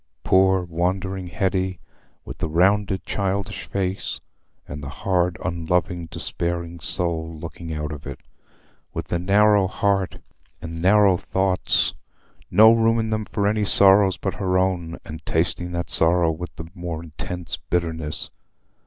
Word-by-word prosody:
Poor 95 0 +4
wandering 90 +2 -2
Hetty, 95 -1 -1 0.5
with - - -9
the - - -2
rounded 95 +4 +2
childish 100 -1 -2
face 95 -1 -3 0.5
and 75 - -7
the 70 - -6
hard, 90 0 0
unloving, 85 +1 -1
despairing 85 +1 -3
soul 80 -1 +1
looking 80 +1 -8
out 75 -1 -3
of 75 -1 -8
it—with 70 -2 -11
the 85 - 0
narrow 100 +1 +4
heart 95 -1 0 0.4
and 80 0 -7
narrow 100 0 +5
thoughts, 95 +1 0 0.6
no 110 +1 +7
room 115 0 +3
in 110 -1 -1
them 110 -1 -1
for 100 -1 -2
any 105 0 +1
sorrows 100 -1 +6
but 95 - -3
her 95 -1 0
own, 90 -3 -1
and 80 0 -9
tasting 90 +2 -1
that 85 0 -2
sorrow 85 0 +3
with 90 +3 -7
the 80 - -7
more 85 -2 -5
intense 85 +2 -6
bitterness! 80 -3 -2
90 Hz, 135 wpm, -23 LUFS, 85-95 Hz, 0.6 s, no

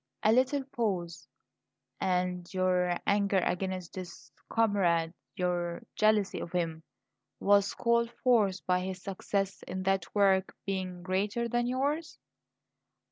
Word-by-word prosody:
A 215 - +5
little 260 +4 +3
pause. 195 - -3 0.7
"And 180 -1 -1
your 180 -1 +1
anger 200 -1 +2
against 185 -1 -1
this 175 -9 -9 0.2
comrade, 180 -7 +2 0.2
your 175 -1 -1
jealousy 215 -2 +2
of 170 - -6
him, 165 -3 -1 0.6
was 200 0 +3
called 235 0 +2
forth 210 -7 +3
by 180 0 +2
his 185 0 -5
success 195 0 -2
in 185 +1 -4
that 195 -1 0
work 195 -2 +3
being 185 -2 -3
greater 200 +5 0
than 240 +1 0
yours?" 285 +6 -1
190 Hz, 120 wpm, -30 LUFS, 180-215 Hz, 0.7 s, A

